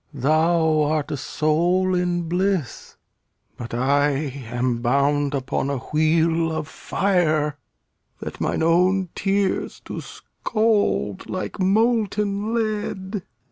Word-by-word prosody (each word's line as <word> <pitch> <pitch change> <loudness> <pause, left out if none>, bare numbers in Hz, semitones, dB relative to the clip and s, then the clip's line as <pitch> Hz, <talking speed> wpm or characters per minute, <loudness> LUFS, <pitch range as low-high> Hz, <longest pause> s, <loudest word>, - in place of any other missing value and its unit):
Thou 155 +3 +2
art 150 0 0
a - - -1
soul 175 +7 +1
in 175 -1 0
bliss; 180 - -2 0.6
but 120 - -8
I 140 +4 +2 0.4
am 120 0 -1
bound 140 +3 +1
Upon 135 0 -2
a 140 - -1
wheel 160 +4 +1
of 155 -1 -3
fire, 155 -6 0 0.6
that - - -7
mine - - 0
own 180 +3 +3
tears 195 0 -1
Do - - -5
scald 215 - -1
like 185 +2 -4
molten 210 0 +1
lead. 210 -3 -2
165 Hz, 105 wpm, -23 LUFS, 145-195 Hz, 0.6 s, own